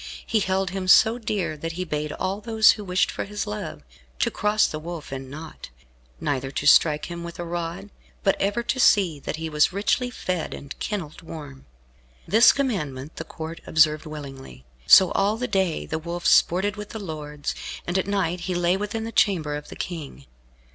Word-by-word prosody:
He 225 - +1
held 190 -1 0
him 190 -1 -4
so 220 +5 +6
dear, 195 -8 -2
that 165 +2 -5
he 180 +2 -3
bade 150 -2 -3
all 195 +2 -3
those 220 -1 +5
who 210 - -5
wished 185 -1 +1
for - - -4
his 210 +1 -4
love, 210 0 -6 0.3
to 235 - +1
cross 210 0 +2
the 155 - -3
Wolf 165 -3 -7
in 135 -1 -6
naught, 155 - -9 0.5
neither 135 -2 -2
to 140 - -4
strike 150 +1 +5
him 170 -1 -6
with 170 0 -8
a 175 - -4
rod, 175 +3 -5 0.3
but 195 - +3
ever 205 +4 0
to 260 - -1
see 185 - +4
that 140 - -4
he 160 +1 -4
was 150 +1 +3
richly 210 +6 0
fed 185 -7 -3
and 140 +1 -8
kennelled 180 -8 -4
warm. 145 - -10 0.6
This 220 +7 +7
commandment 155 - -3
the - - -4
Court 160 +1 -8
observed 155 0 +3
willingly. 135 - -9 0.2
So 190 - +8
all 205 +2 +1
the 250 +2 -2
day 190 -6 0
the 160 - -3
Wolf 170 +2 -6
sported 200 +4 +3
with 210 0 -7
the 220 - -6
lords, 150 -5 -5 0.3
and 175 - -3
at 190 - -2
night 185 -3 0
he 180 - 0
lay 175 +1 +2
within 210 +3 -3
the 225 - -5
chamber 165 -10 +2
of 150 0 -7
the - - -9
King. 145 - -6
175 Hz, 195 wpm, -24 LUFS, 155-205 Hz, 0.6 s, So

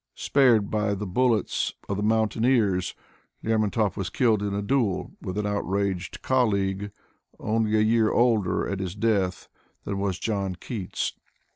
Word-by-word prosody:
Spared 120 -7 +3
by 105 -1 0
the 105 +1 -4
bullets 110 +2 +1
of 100 - -1
the 100 - -3
mountaineers, 110 -3 +1 0.5
Lermontov 110 -2 +1
was 95 -3 -3
killed 115 -5 +2
in 105 -1 -2
a 100 +1 -2
duel 110 -4 0
with 95 +2 -5
an 105 - -1
outraged 100 -3 -2
colleague, 100 -5 +1 0.5
only 110 0 +1
a - - +4
year 110 0 +3
older 115 -6 +2
at 100 - -3
his 95 -1 -4
death 100 -4 0 0.4
than 100 -1 -3
was 100 -2 -1
John 100 -4 -2
Keats. 100 0 -4
105 Hz, 145 wpm, -26 LUFS, 100-110 Hz, 0.5 s, a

